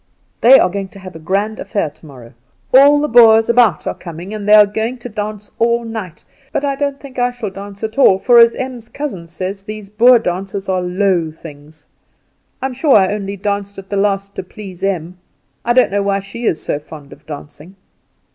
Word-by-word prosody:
"They 260 +3 +8
are - - +3
going 195 0 -4
to 200 - -15
have 185 -3 -11
a - - -8
grand 200 +6 -2
affair 200 -8 -2
tomorrow; 130 -7 -15 0.4
all 285 +3 +7
the 300 - 0
Boers 225 -2 +6
about 235 -8 +3
are - - -2
coming, 175 +4 -9
and 210 -1 -4
they 210 - +8
are 210 -1 +8
going 220 +5 -3
to 245 0 -9
dance 210 -1 -6
all 235 +1 +2
night; 215 -7 -7 0.3
but 285 - -1
I 280 -1 -1
don't 280 0 -2
think 270 -3 -9
I 245 0 +2
shall 245 -5 -6
dance 200 +1 -10
at 220 +4 -4
all; 190 -8 +6
for, 240 +4 +5
as 235 0 +6
Em's 250 -3 -6
cousin 240 -14 -6
says, 185 +4 -5
these 210 0 -9
Boer 240 +4 +5
dances 195 -1 -4
are 185 -1 0
low 180 -2 0
things. 155 -1 -14 0.8
I - - 0
am 265 - -3
sure 270 +2 +3
I 195 -1 +4
only 200 -1 -5
danced 200 0 -3
at 195 0 -10
the - - -1
last 200 0 0
to - - -2
please 190 -3 -11
Em. 180 -2 -3 0.4
I 240 - +1
don't 255 -4 +3
know 200 0 0
why 200 0 0
she 200 +4 -5
is 160 - -1 0.2
fond 145 -3 -11
of 145 - -20
dancing. 150 +4 -10
200 Hz, 210 wpm, -16 LUFS, 185-235 Hz, 0.8 s, They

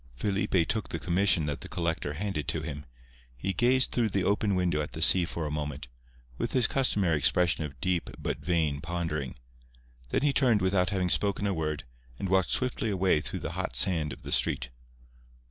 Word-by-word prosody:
Felipe 95 - +1
took 110 -3 -2
the - - -3
commission 90 -2 +2
that 75 -1 -4
the - - -7
collector 80 -3 -2
handed 95 -2 -3
to 80 - -2
him. 75 -2 -6 0.5
He 95 +9 -2
gazed 125 +6 +3
through 115 -3 +1
the 95 -1 -1
open 100 0 +1
window 90 -4 +1
at 75 - -6
the 80 - -5
sea 90 +1 +6
for 85 -1 -4
a 75 - -3
moment, 75 -3 -4 0.5
with - - -2
his 125 -3 +4
customary 100 - +2
expression 80 +1 +2
of 70 -3 -10
deep 90 -2 -1
but - - -3
vain 80 -4 0
pondering. 80 -6 -3 0.7
Then 130 - 0
he 145 -1 +3
turned 125 -7 +3
without 95 -1 +2
having 95 -3 0
spoken 100 0 +1
a 100 - +1
word, 75 -3 -3 0.3
and 95 - -4
walked 95 -1 +2
swiftly 125 -3 -1
away 95 -5 +2
through - - -4
the - - -4
hot - - -4
sand 75 +2 +1
of 60 - -10
the - - -7
street. - - +3
90 Hz, 195 wpm, -28 LUFS, 75-100 Hz, 0.7 s, sea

